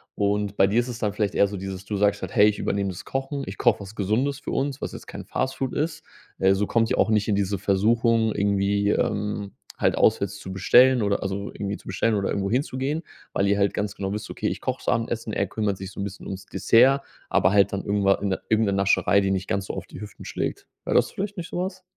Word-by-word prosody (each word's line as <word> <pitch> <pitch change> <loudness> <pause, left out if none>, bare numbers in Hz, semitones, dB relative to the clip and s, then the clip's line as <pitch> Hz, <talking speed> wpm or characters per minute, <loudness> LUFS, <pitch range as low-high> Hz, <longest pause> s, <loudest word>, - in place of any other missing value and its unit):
Und 100 0 0
bei 95 - +6
dir 100 +4 +2
ist 120 - 0
es 120 - -5
dann 105 -3 -1
vielleicht 105 -1 -1
eher 100 - +4
so 100 0 -6
dieses 95 0 -6
du 105 - -3
sagst 100 0 +2
halt: - - -5
„Hey, 105 - +7
ich 105 - +1
übernehme 100 0 -1
das 90 - -7
Kochen, 135 +1 -3
ich - - -7
koche 120 -3 +3
was 100 +1 -9
Gesundes 120 +8 0
für - - -6
uns, 135 0 -2
was - - -4
jetzt - - -10
kein - - -8
Fast 130 0 -2
Food 130 -2 -2
ist. 150 +1 -2 0.4
Äh, 95 0 +4
so 100 +2 0
kommt 115 +1 +1
ihr - - 0
auch - - +3
nicht 105 -1 +2
in 105 - +2
diese 100 -1 0
Versuchung 110 +3 +2
irgendwie, 100 0 +1
ähm, 105 -1 -1 0.3
halt - - +2
auswärts - - +2
zu 95 - -8
bestellen 120 +6 +5
oder 100 -1 0
also 100 +1 -3
irgendwie 100 0 -4
zu - - -21
bestellen, 105 +4 +1
oder 100 -1 0
irgendwohin 100 +7 0
zu 130 - -7
gehen, 150 +5 -1 0.3
weil 100 - +1
ihr 100 0 +2
halt 100 0 +2
ganz 105 -1 -2
genau 95 0 -4
wisst: 105 - -5
„Okay, - - -3
ich - - -3
koche - - -2
das - - -14
Abendessen, 115 -1 -2
er 100 - +1
kümmert 105 -1 -1
sich 95 0 -7
so 100 - -10
'n - - -1
bisschen 100 -1 -7
ums 95 0 -6
Dessert.“ 130 +4 +4 0.3
Aber 95 - +3
halt 100 -1 +4
dann 100 - -2
irgendwa 100 -1 +3
in 100 -2 -1
irgend 110 0 +3
'ne 100 - +1
Nascherei, 100 +1 +3
die 95 0 0
nicht 95 -1 -1
ganz 95 -1 -1
so - - -5
auf - - -5
die - - -11
Hüften 105 -2 -10
schlägt. - - -3 0.2
Wäre - - -1
das - - +3
vielleicht 205 +1 -4
nicht 170 - -5
so - - -5
was? 185 +1 -4
100 Hz, 260 wpm, -24 LUFS, 100-115 Hz, 0.4 s, Hey